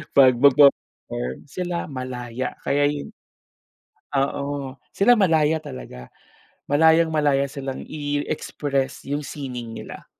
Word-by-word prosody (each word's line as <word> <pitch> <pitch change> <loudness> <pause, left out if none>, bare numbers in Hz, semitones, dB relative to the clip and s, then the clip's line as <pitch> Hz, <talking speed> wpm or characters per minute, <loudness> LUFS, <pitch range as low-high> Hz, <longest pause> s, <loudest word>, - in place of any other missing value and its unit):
'pag 130 -2 +7
magpe-perform, 130 - +3
sila 175 +3 -4
malaya 130 -1 -5
kaya 145 +1 +2
'yon. 145 0 -4 1.1
Oo. 140 -1 -2 0.2
Sila 205 +5 +4
malaya 160 -7 +3
talaga. 60 - -9 0.6
Malayang-malaya 150 -2 +3
silang 135 -1 -5
i-express 145 -2 -3
yung 145 +1 -2
sining 125 -6 -6
nila. - - -9
140 Hz, 95 wpm, -23 LUFS, 130-150 Hz, 1.1 s, pag